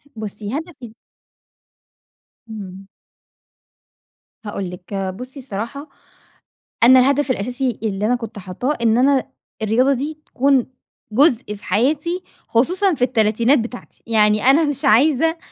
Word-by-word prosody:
بُصي 215 +3 -5
هدفي 290 -9 -9 1.6
امم. 195 -3 -9 1.6
هاقول 200 -3 -4
لِك 180 +2 -11
آآ، 195 -1 -2
بُصّي 255 +8 -10
الصراحة، 245 +5 -6 0.9
أنا 255 +2 +8
الهدف 280 +1 +2
الأساسي 245 +2 -2
اللي 205 -2 -1
أنا 245 +3 +2
كنت 230 -3 -7
حاطاه، 200 +10 -3
إن 225 0 +3
أنا 270 +1 +2 0.3
الرياضة 245 +6 +2
دي 295 +4 -4
تكون 270 -1 +1 0.4
جزء 240 -3 +2
في 205 - -16
حياتي 300 - 0 0.2
خصوصًا 360 - +2
في 265 - -7
التلاتينات 235 +2 +2
بتاعتي، 240 +2 -8
يعني 215 -1 +3
أنا 275 +5 +5
مش 290 -2 -2
عايزة 300 +8 +3
245 Hz, 120 wpm, -20 LUFS, 210-280 Hz, 1.6 s, أنا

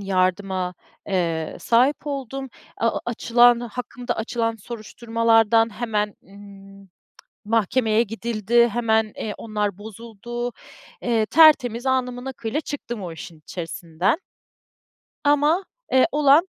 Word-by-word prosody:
yardıma, 185 -1 0 0.3
eee, 170 -4 -1
sahip 255 +6 +2
oldum. 270 -1 -4 0.3
A 230 - +2
o - - -4
açılan 240 0 +4
hakkımda 245 +1 -5
açılan 230 0 -1
soruşturmalardan 225 0 +1
hemen, 210 -3 -1
ımm, 195 0 -14 0.6
mahkemeye 225 +1 +2
gidildi, 230 +1 +1
hemen, 220 -1 +2
eee, 210 -2 -4
onlar 210 -3 -2
bozuldu. 230 +3 -6 0.5
Eee, 225 -3 +1
tertemiz, 265 -6 +5
alnımın 250 -1 -1
akıyla 255 +1 -3
çıktım 240 -8 -6
o 175 -3 -5
işin 160 0 -10
içerisinden. 170 - -2 1.1
Ama, 295 +6 +3 0.3
eee, 260 -1 +5
olan 300 +5 +5
230 Hz, 105 wpm, -23 LUFS, 205-245 Hz, 1.1 s, tertemiz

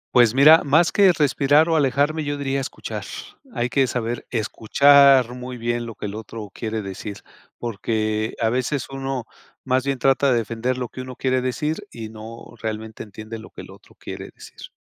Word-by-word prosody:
Pues 120 -2 +6
mira, 150 +4 +7
más 160 +4 +3
que 195 -3 +6
respirar, 145 0 +3
o, 165 - +2
alejarme, 145 +2 +1
yo 145 0 -3
diría 135 -1 -1
escuchar. 135 - -6 0.5
Hay 120 - 0
que 135 +1 +2
saber 120 -1 -3
escuchar 130 +3 +5
muy 125 0 -7
bien 120 0 -2
lo 115 - -8
que - - -7
el 100 - -5
otro 110 -1 -8
quiere 110 -1 -3
decir, 100 +1 -7 0.4
porque 110 -1 -2
a 115 - +2
veces 130 +2 -1
uno 135 -3 -4 0.4
más 130 0 +1
bien 135 -2 -2
trata 135 0 +3
de 120 - +3
defender 115 +3 -2
lo 125 -1 -3
que 130 - -8
uno 130 -1 -9
quiere 130 -1 +1
decir, 155 +9 -2
y 115 -2 -7
no 110 +2 -11
realmente 110 0 -5
entiende 110 +2 -9
lo 110 - -12
que - - -14
el - - -13
otro - - -18
quiere - - -8
decir. - - -12
125 Hz, 185 wpm, -22 LUFS, 110-140 Hz, 0.5 s, mira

